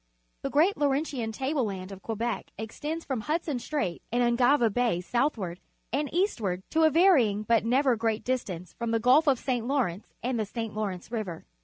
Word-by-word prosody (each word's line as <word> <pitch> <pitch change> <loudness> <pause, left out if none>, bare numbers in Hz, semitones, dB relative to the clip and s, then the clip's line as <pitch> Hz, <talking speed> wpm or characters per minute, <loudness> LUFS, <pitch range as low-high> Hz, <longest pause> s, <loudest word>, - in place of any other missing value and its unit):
The - - -2
great 340 +8 +3
Laurentian 275 -5 0
table 265 +4 -1
land 195 -3 -4
of 195 -1 -9
Quebec_ 225 0 -2
extends 295 +10 -5
from 260 -5 -2
Hudson 305 0 -1
Strait 205 - -2
and 245 +1 +2
Ungava 240 -1 +3
Bay 240 -7 +1
southward 195 - -1 0.3
and 285 +1 0
eastward 225 - 0
to 320 0 +4
a - - +6
varying 275 - +4
but 225 0 +2
never 260 +2 +3
great 225 -1 -1
distance 185 -9 -3
from 235 -1 -4
the 225 0 +2
Gulf 255 +7 +5
of 270 -3 +5
St. 245 -2 -2
Lawrence 240 -9 -1
and 245 -1 -1
the 215 - 0
St. 225 0 -4
Lawrence 205 -2 -4
River. 210 -8 -4
235 Hz, 180 wpm, -28 LUFS, 215-280 Hz, 0.3 s, a